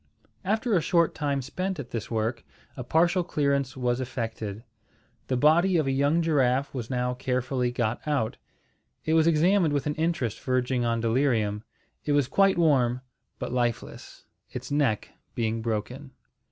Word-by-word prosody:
After 220 +4 0
a 170 - +3
short 170 +1 +2
time 140 -3 -1
spent 185 +8 -3
at 130 - -7
this 115 -3 -4
work, 115 +1 -2 0.3
a 125 - -5
partial 170 +7 +2
clearance 140 -5 0
was 125 0 0
effected. 115 -4 -5 0.6
The 130 - 0
body 170 +7 +4
of 155 - +1
a 135 - 0
young 145 +5 +2
giraffe 140 -3 +1
was 120 -4 -5
now 125 -1 -1
carefully 125 0 -1
got 120 -1 -1
out. 140 -7 0 0.7
It 160 - +1
was 160 0 +4
examined 170 0 +3
with 140 - -1
an 150 - 0
interest 155 -8 -1
verging 130 -1 0
on 115 -1 0
delirium. 115 -3 +1 0.4
It 145 - 0
was 145 -3 +3
quite 195 +5 +3
warm, 130 -7 +3 0.4
but - - -5
lifeless, 120 -2 -3 0.2
its - - -7
neck 140 -7 +1 0.3
being 115 -1 -1
broken. 120 +5 -3
130 Hz, 155 wpm, -27 LUFS, 120-155 Hz, 0.7 s, body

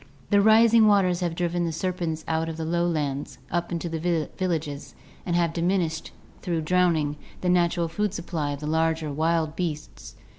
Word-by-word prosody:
The 205 0 +5
rising 220 +1 +6
waters 190 -4 +3
have 175 -2 -2
driven 175 0 -1
the 165 - -1
ser 180 +3 -2
pents 160 -3 -4
out 160 0 0
of 160 - -6
the 160 - -3
lowlands, 160 -6 -1
up 175 +1 -1
into 170 0 -2
the 165 -1 -1
villages, 160 -6 -3 0.3
and 175 - 0
have 170 -2 +1
diminished, 170 -2 0 0.3
through 170 -2 -1
drowning, 160 -3 +1 0.2
the 180 - 0
natural 175 -1 +2
food 205 +5 -1
supply 170 -5 -3
of 140 - -7
the - - -4
larger 160 -1 0
wild 160 +1 0
beasts. 160 -4 -5
170 Hz, 175 wpm, -25 LUFS, 160-180 Hz, 0.3 s, rising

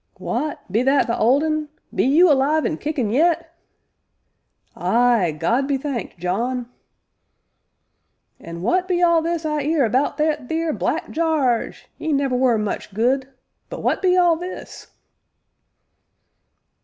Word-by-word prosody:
"W'at 305 0 -3
be 220 +5 +2
that 270 +2 +3
the 235 - -1
Old 260 +7 +3
Un 310 -1 -1 0.2
be - - +1
you 310 +6 +5
alive 290 +3 +2
an' 310 - -2
kickin' 285 -8 -2
yet?" 330 +4 +1 1.2
"Ay, 235 -7 +2
God 235 +11 +1
be 280 -1 0
thanked, 265 -9 -5
John!" 235 +8 -2 1.7
"And 170 +1 -8
w'at 365 - +1
be 360 -1 +1
all 340 -1 +4
this 335 0 -2
I 300 -1 -1
'ear 295 -1 +1
about 255 +6 0
that 300 -4 -1
theer 320 -1 -1
Black - - -2
Jarge 305 -8 0
'e 315 - -2
never 275 -2 0
were 250 -2 +3
much 210 -2 -4
good 255 +4 +1 0.4
but - - -6
w'at - - -1
be 370 -1 +3
all 350 -2 +4
this?" 355 +3 -8
280 Hz, 140 wpm, -21 LUFS, 245-320 Hz, 1.7 s, you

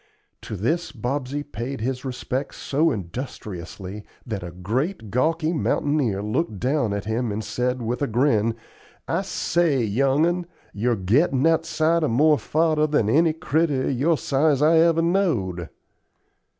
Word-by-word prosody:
To 110 - -6
this 155 - -1
Bobsey 135 +3 -3
paid 135 -2 -5
his 125 +3 -3
respects 130 +1 -4
so 155 +4 +1
industriously 100 - -6 0.2
that 110 -6 -4
a 90 - -6
great, 110 - -3
gawky 160 +6 +1
mountaineer 145 - 0
looked 110 - -2
down 130 -1 +1
at 100 0 -3
him 110 +1 -1
and 105 +2 -3
said, 125 +2 -2
with 120 +4 -2
a 145 - +1
grin, 115 -2 +2 0.5
"I - - 0
say, 160 -7 +1
young 135 +8 +2
'un, 175 0 -1 0.3
you're 120 +4 +1
gettin' 130 - +2
outside 165 0 +2
of 155 - +1
more 150 +6 +4
fodder 155 -1 +1
than 145 -8 +1
any 160 +3 +4
critter 155 -3 0
of - - +1
your 150 +6 +2
size 140 0 +2
I 160 +1 +5
ever 165 0 +4
knowed." 120 - 0
135 Hz, 150 wpm, -23 LUFS, 110-155 Hz, 0.5 s, I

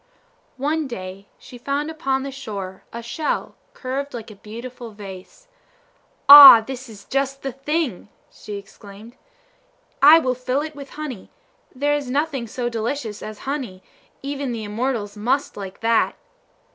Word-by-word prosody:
One 300 +3 -1
day 190 -4 -8
she 245 - -13
found 285 +4 -2
upon 270 -4 -1
the 275 - -5
shore 200 -8 -7
a 235 0 -7
shell 295 +6 -3 0.2
curved 275 +1 -4
like 225 -1 -8
a - - -12
beautiful 235 +4 -9
vase. 205 - -12 0.8
"Ah, 280 -4 +13
this 255 +2 -8
is 200 -3 -13
just 275 0 -2
the 270 - -3
thing!" 275 - -3 0.2
she 210 - -9
exclaimed. 200 +3 -13 0.9
"I 300 +4 +9
will 260 -6 +1
fill 255 +2 -2
it 305 0 -6
with 280 -1 -10
honey; 280 -10 -7 0.5
there 290 +3 +1
is 290 -3 -2
nothing 280 -3 -1
so 240 +2 -3
delicious 230 -1 -4
as 215 -1 -8
honey; 255 -10 -4 0.4
even 275 -2 -3
the 225 -2 -5
immortals 215 -1 -3
must 250 +7 -1
like 195 -2 -8
that!" 230 0 +2
255 Hz, 145 wpm, -22 LUFS, 215-280 Hz, 0.9 s, Ah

